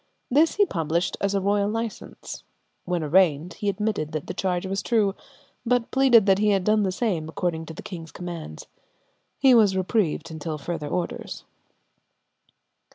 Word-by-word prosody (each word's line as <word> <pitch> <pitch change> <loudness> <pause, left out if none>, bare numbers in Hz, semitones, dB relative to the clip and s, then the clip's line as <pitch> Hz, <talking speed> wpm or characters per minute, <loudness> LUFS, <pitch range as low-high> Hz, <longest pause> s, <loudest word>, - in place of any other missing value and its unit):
This 305 +5 +4
he 410 - +4
published 170 - -1
as 200 0 +1
a - - +3
royal 200 +1 +1
license. 225 0 -5 0.4
When 175 -2 -1
arraigned 165 0 +3
he 205 - -2
admitted 200 -7 -2
that 155 -2 -3
the - - -5
charge 180 0 -1
was 195 +1 -2
true, 210 -4 +2 0.5
but 245 -1 0
pleaded 260 -6 +5
that 195 -1 +4
he 210 0 +3
had 195 -2 +2
done 215 +2 +3
the 190 -2 +1
same 185 -6 -1
according 165 -1 -2
to 160 - -7
the - - -9
king's 165 -4 -8
commands. 170 - -7 0.7
He 265 -2 +5
was 210 -5 +5
reprieved 185 -4 0
until 160 0 -4
further 150 +1 -4
orders. 175 +3 -4
190 Hz, 160 wpm, -25 LUFS, 165-215 Hz, 0.7 s, pleaded